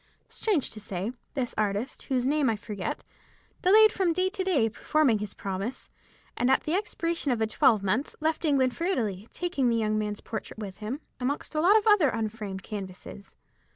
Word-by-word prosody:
Strange 390 - 0
to 220 - -7
say, 200 +1 -4 0.2
this 255 -3 -2
artist, 210 +4 -1
whose 255 -2 +1
name 285 -1 +2
I 225 - +1
forget, 210 -2 -5 0.6
delayed 430 +3 +7
from 365 -5 +1
day 370 +2 +1
to 385 -1 -3
day 310 -12 +2
performing 245 +1 +2
his 210 -1 -5
promise, 195 +5 -5 0.4
and 245 - +1
at 265 - +3
the 310 - -2
expiration 335 -6 -1
of 240 - 0
a 220 - +2
twelvemonth 215 +2 +2
left 315 +2 0
England 265 -5 +2
for 335 - -2
Italy, 220 - -1
taking 340 -8 0
the 230 - +2
young 215 -1 +1
man's 210 -1 -3
portrait 220 -1 -6
with 200 -3 -7
him, 225 +8 -5 0.2
amongst 275 +6 -2
a 305 - +1
lot 390 +6 +6
of 430 - 0
other 415 -10 +5
unframed 215 -4 -4
canvases. 195 0 -8
245 Hz, 185 wpm, -28 LUFS, 210-315 Hz, 0.6 s, delayed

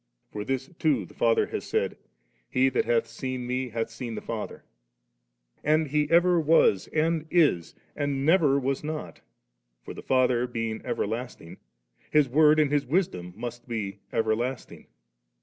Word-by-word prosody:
For 105 - -4
this 130 +2 -2
too 140 - +1
the - - -16
Lord 115 -1 +3
has - - -3
said, - - -1 0.5
'He 130 +1 +3
that 130 - 0
hath 120 0 +2
seen 125 +2 -5
Me, 125 +1 -2
hath 115 0 -3
seen 115 0 -6
Uie - - -6
Father - - -5 0.9
3.' - - -36
And 155 0 +3
He 150 +1 +1
ever 175 +1 +4
was 155 - +3
and 160 0 0
is, 145 - +2 0.2
and 140 -1 -1
never 155 -5 +4
was 135 +1 -2
not 155 0 -6 0.6
For - - -8
the - - -9
Father 125 -1 +2
being 115 -2 -3
ever - - -1
lasting. 115 -6 -6 0.5
His 150 -2 +4
Word 150 +4 +5
and 150 -2 +3
His 145 -1 +1
Wisdom 125 - -1
must 120 +2 -7
be 105 -4 -4
everlasting! 115 +3 -2
130 Hz, 160 wpm, -27 LUFS, 115-150 Hz, 0.9 s, Word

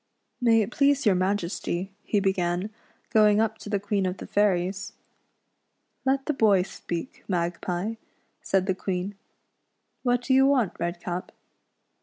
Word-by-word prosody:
"May 225 -2 +5
it 205 - -6
please 280 0 +3
your 205 - +5
Majesty," 185 0 -1
he 210 - +1
began, 190 0 0 0.4
going 210 -1 +5
up 220 0 0
to - - -8
the 205 -1 +1
Queen 200 -1 0
of 180 +1 -3
the - - -8
Fairies. 195 0 0 0.5
" - - -49
Let 270 0 +2
the 300 - 0
boy 205 -7 +4
speak, 175 +4 -6
Magpie," 175 +3 -2 0.4
said 190 -1 +1
the 190 - +1
Queen; 185 +1 -3 0.9
"what 245 -1 +1
do 260 - +1
you 270 +1 +6
want. 255 -9 +2
Redcap 175 +1 -3
200 Hz, 145 wpm, -26 LUFS, 180-225 Hz, 0.9 s, you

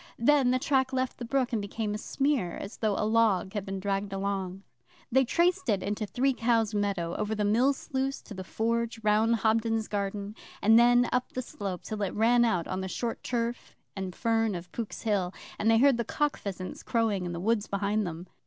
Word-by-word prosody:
Then 270 +1 +4
the 255 - +3
track 265 0 +1
left 260 -1 -2
the 240 - -4
brook 255 0 0
and 220 - +1
became 210 +1 -3
a - - -2
smear, 270 -9 0
as 200 - -7
though 215 -3 0
a - - 0
log 215 -4 +2
had 205 -3 -2
been 195 -1 -4
dragged 200 +1 -2
along. 195 -1 -3 0.5
They 265 +2 +5
traced 340 +1 +1
it 200 -3 +1
into 210 +1 -2
Three 260 +7 +1
Cows 230 -3 +1
meadow, 195 -5 -1
over 215 +1 -1
the 210 -1 0
mill 235 +7 +4
sluice 270 -1 -3
to - - -10
the 185 -1 -6
Forge, 230 +3 -1
round 215 +2 +3
Hobden's 225 0 +1
garden, 200 0 -3 0.3
and 225 +2 +6
then 245 +1 +5
up 250 0 -1
the 255 - -3
slope 195 -6 -5
till 215 -1 -5
it 195 - -2
ran 235 +3 +4
out 185 -8 +1
on 185 0 -3
the 190 - -3
short 230 +5 -3
turf 235 0 -3 0.2
and 190 -3 -5
fern 225 -3 +1
of 175 0 -8
Pook's 230 -3 -5
Hill, 195 -4 0 0.2
and 220 - +2
they 225 - +5
heard 270 +1 +5
the 235 - 0
cock 295 +5 0
pheasants 185 -2 -6
crowing 220 -5 0
in 175 - -3
the 170 - -4
woods 215 +2 +1
behind 200 +1 0
them. 170 +1 -6
220 Hz, 210 wpm, -28 LUFS, 200-240 Hz, 0.5 s, and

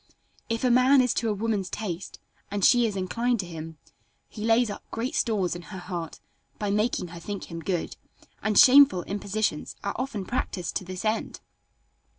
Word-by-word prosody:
If 230 +1 -2
a 250 - +3
man 255 +3 +6
is 250 -2 +3
to 230 - -1
a - - +1
woman's 205 -3 -1
taste, 190 -4 -5 0.3
and 200 -1 0
she 240 -1 +5
is 210 - -4
inclined 230 +6 0
to - - -8
him, 160 -2 -8 0.5
he 210 - -8
lays 225 0 +3
up - - -8
great 235 +3 -3
stores 200 -7 0
in 175 - -7
her 190 +2 -9
heart 175 -3 -6 0.4
by 205 -1 -2
making 210 -3 0
her 170 0 -9
think 200 +1 -6
him 165 - -5
good; 170 +1 -3 0.4
and 215 -1 0
shameful 270 -8 +7
impositions 200 -4 -2
are 200 - -2
often 220 -6 -3
practiced 185 -6 -3
to - - -6
this 185 +3 -6
end. 215 +1 -1
205 Hz, 180 wpm, -26 LUFS, 180-230 Hz, 0.5 s, shameful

